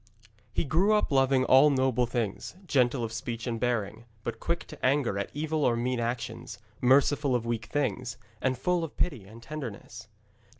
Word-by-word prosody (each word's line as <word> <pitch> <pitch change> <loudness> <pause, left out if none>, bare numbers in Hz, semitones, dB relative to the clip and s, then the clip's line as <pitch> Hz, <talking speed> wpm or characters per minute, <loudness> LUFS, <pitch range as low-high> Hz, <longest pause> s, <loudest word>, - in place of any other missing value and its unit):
He - - 0
grew 175 +8 +3
up 210 - +2
loving 135 -1 +3
all 135 +3 +7
noble 130 -3 +2
things, 115 - -3
gentle 125 -5 +2
of 110 -1 -4
speech 115 0 -4
and 115 -2 -2
bearing, 115 -2 -1 0.2
but 120 - -4
quick 170 0 -2
to 155 - -11
anger 130 -7 +2
at 100 - -3
evil 155 +1 -1
or 120 - +3
mean 125 +1 -1
actions, 120 +1 -4 0.2
merciful 135 +1 +4
of 120 -1 -1
weak 115 -2 -2
things, 125 -2 -2 0.2
and 130 -1 +1
full 175 +5 0
of 160 - -7
pity 135 - -1
and 115 +4 -13
tenderness. 115 -6 -7
125 Hz, 175 wpm, -28 LUFS, 115-145 Hz, 0.2 s, all